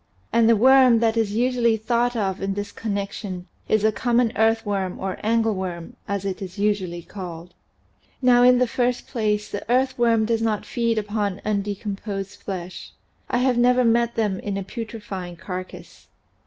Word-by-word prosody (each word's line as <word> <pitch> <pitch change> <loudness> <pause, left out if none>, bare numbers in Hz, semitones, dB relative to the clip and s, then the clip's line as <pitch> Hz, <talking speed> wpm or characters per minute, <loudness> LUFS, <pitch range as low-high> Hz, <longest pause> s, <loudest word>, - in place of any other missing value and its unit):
And 230 -1 +4
the 230 - +6
worm 255 +1 +6
that 225 0 +2
is 220 -3 0
usually 240 -1 +2
thought 240 +2 0
of 195 -4 -1
in 195 0 -2
this 205 0 -4
connection 200 -3 -4 0.2
is 215 -1 +2
the 220 - +4
common 240 +1 +1
earthworm 205 -4 +1
or 190 -1 -4
angleworm 200 -6 -1
as 200 -1 -2
it 195 +1 -3
is 185 0 -7
usually 190 -4 -1
called. 175 -2 -8 0.7
Now 250 -2 +5
in 250 0 +6
the 250 - +3
first 245 +1 -1
place 210 -4 -1
the 205 - -5
earthworm 240 -3 +2
does 225 0 0
not 220 -2 -1
feed 230 -2 0
upon 205 -2 -2
undecomposed 200 -1 -3
flesh; 185 -2 -7 0.4
I - - +1
have 250 -2 +2
never 250 +1 +4
met 235 0 +2
them 210 -4 0
in 200 -1 -3
a 195 - -3
putre 225 +3 -7
fying 185 -4 -6
carcass. 185 +1 -8
215 Hz, 165 wpm, -23 LUFS, 195-235 Hz, 0.7 s, the